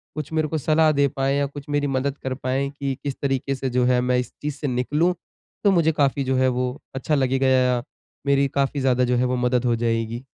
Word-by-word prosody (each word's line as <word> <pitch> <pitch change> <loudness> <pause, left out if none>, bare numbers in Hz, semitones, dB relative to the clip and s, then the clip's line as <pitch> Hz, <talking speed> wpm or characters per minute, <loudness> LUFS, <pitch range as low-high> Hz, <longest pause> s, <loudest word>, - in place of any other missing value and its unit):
कुछ 155 -1 -5
मेरे 155 -1 +1
को 160 - -2
सलाह 155 +1 +3
दे 140 -1 +3
पाएँ 135 0 -1
या 140 - +1
कुछ 140 0 -8
मेरी 145 0 0
मदद 135 +1 -1
कर 130 - -2
पाएँ, 130 +1 -2
कि 140 -1 -4
किस 140 -2 -3
तरीके 135 0 -1
से 130 0 -3
जो 125 0 +1
है 125 0 +3
मैं 125 0 +1
इस 125 - -4
चीज़ 150 -1 -3
से 145 - -3
निकलूँ, 145 +8 +1 0.5
तो 200 - +5
मुझे 165 -4 +3
काफ़ी 140 -2 +1
जो 130 0 0
है, 130 0 +3
वो 125 +2 -2 0.2
अच्छा 140 +3 0
लगेगा 135 -1 +1
या 125 -2 +3 0.4
मेरी 140 0 +3
काफ़ी 140 +1 +1
ज़्यादा 125 -1 +2
जो 125 0 +1
है 125 - +2
वो 125 0 0
मदद 125 0 +1
हो 120 -1 +2
जाएगी। 115 +1 -1
135 Hz, 235 wpm, -23 LUFS, 125-145 Hz, 0.5 s, तो